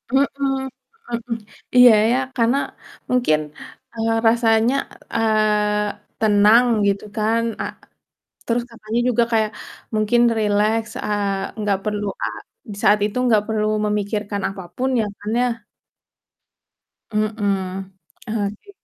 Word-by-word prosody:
Mhm 275 +1 +5 0.2
mhm. 265 - -4 0.4
Iya, 250 -1 +9 0.2
ya 250 - +3 0.2
karena 235 +3 +3 0.5
mungkin, 245 -12 +2 0.6
eee, 225 0 0
rasanya, 225 +1 +3 0.4
eee, 210 -2 0
tenang 215 +3 +5 0.2
gitu 200 +1 0
kan. 220 +2 +2 0.2
Eee, - - -4 0.7
terus 235 +1 +1
katanya 225 0 -4
juga 240 -1 +3
kayak 220 -1 +2 0.4
mungkin 215 +3 +2 0.2
rileks, 215 +1 +1
eee, 200 0 -2
nggak 205 -2 +1
perlu 210 -1 -2 0.2
a - - +2 0.5
di 200 - -8
saat 210 0 +5
itu 215 +4 -4
nggak 215 -3 +4
perlu 215 -1 0 0.2
memikirkan 210 -1 -2
apa 195 -1 -7
pun 260 +1 0
ya - - +1
kan 210 - -5
ya? - - +3 1.7
Mhm, 200 -3 -1 0.4
oke. 215 - -3
215 Hz, 115 wpm, -21 LUFS, 205-230 Hz, 1.7 s, Iya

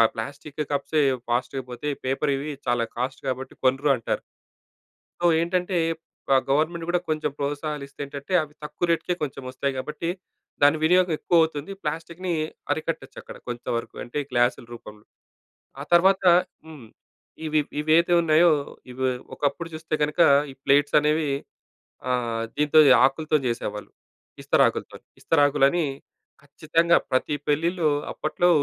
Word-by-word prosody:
Plastic 140 +6 -7
కప్సే 145 +2 0 0.3
ఫాస్ట్‌గా 125 +2 -1
పోతాయి. 140 +4 -4
పేపర్‌వి 140 +2 -1 0.2
చాలా 120 -1 +1
కాస్ట్ 130 +2 -3
కాబట్టి 130 0 -4
కొనరు 135 +3 +2
అంటారు. 115 - -2 1.0
సో, - - -3 0.2
ఏంటంటే 180 +2 -1 0.6
ఆహ్, 130 - +4
గవర్నమెంట్ 160 +4 +1
కూడా 180 0 +1
కొంచెం 155 -1 -1
ప్రోత్సాహాలు 145 +1 -3
ఇస్తే, 140 - -20
ఏంటంటే 140 +4 -8
అవి 150 -1 -10
తక్కువ 150 +3 -2
రేట్‌కే 170 +1 +1
కొంచెం 140 -2 -4
వస్తాయి. 135 +2 -2
కాబట్టి 150 +5 -4 0.5
దాని 145 +2 +6
వినియోగం 180 +2 +4
ఎక్కువ 175 - +2
అవుతుంది. 160 +1 -3
ప్లాస్టిక్‌ని 165 +4 -4 0.4
అరికట్టొచ్చక్కడ. 155 -3 -5
కొంత 120 -1 -5
వరకు 115 - -6
అంటే 120 +4 -5
గ్లాసుల 120 -1 +1
రూపంలో. 105 -2 -12 0.8
ఆ - - -3
తర్వాత 190 +3 +5 0.4
హ్మ్. 150 -7 -11 0.6
ఇవి 155 -1 +2 0.2
ఇవైతే 160 +3 +3
ఉన్నాయో 165 +1 +5 0.4
ఇవి 130 +1 -2 0.3
ఒకప్పుడు 150 +4 -2
చూస్తే, 155 0 -4
కనుక 150 +3 -1 0.3
ఈ - - -16
ప్లేట్సనేవి 150 +2 +3 0.8
ఆహ్, 120 -2 -1
దీంతో 150 +1 +4 0.2
ఆకులతో 155 +3 +2
చేసేవాళ్ళు. 105 -3 -4 0.5
ఇస్తరాకులతోని. - - +1 0.2
ఇస్తరాకులని 145 +1 +3 0.6
ఖచ్చితంగా 155 +4 +2
ప్రతి 130 +3 +1
పెళ్ళిలో 165 +2 +1 0.2
అప్పట్లో 175 +3 0
150 Hz, 120 wpm, -24 LUFS, 135-160 Hz, 1.0 s, దాని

